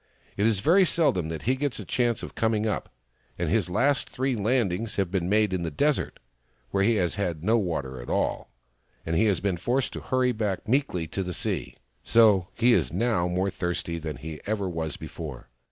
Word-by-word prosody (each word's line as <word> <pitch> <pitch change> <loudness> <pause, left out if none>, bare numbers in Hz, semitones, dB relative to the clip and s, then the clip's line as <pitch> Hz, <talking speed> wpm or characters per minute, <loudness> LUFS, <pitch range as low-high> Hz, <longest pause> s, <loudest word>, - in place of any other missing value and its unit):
" - - -32
It 105 +2 +2
is 105 -4 +1
very 180 - +5
seldom 145 - +1
that 80 -2 -5
he 130 +3 +2
gets 140 -1 -2
a - - -6
chance 120 -3 0
of - - -7
coming 110 -1 +1
up; 110 - -2 0.5
and - - -1
his - - +2
last 135 +9 +1
three 130 0 -1
landings 110 -2 0
have 95 -3 0
been 90 -2 -1
made 105 -1 +3
in 90 - -1
the 85 - -2
desert, 145 - 0 0.5
where 100 - +1
he 115 +3 +3
has 90 -4 +1
had 85 -5 -2
no 115 +4 +3
water 70 - -3
at - - -9
all, - - -1 0.6
and 80 - -1
has 100 0 +3
been 95 -2 0
forced 125 +9 0
to - - -5
hurry 130 -1 +1
back 105 -4 -2
meekly 120 - +1
to 95 - -3
the 90 -1 -3
sea. - - -2 0.3
So 105 -6 +5
he 120 +1 +4
is - - +2
now 110 -7 +1
more 90 +2 0
thirsty 85 -2 -3
than 80 -2 -5
he 75 +1 -8
ever 100 -2 -1
was 80 -3 -3
before. 70 -7 -8
100 Hz, 205 wpm, -26 LUFS, 85-115 Hz, 0.6 s, very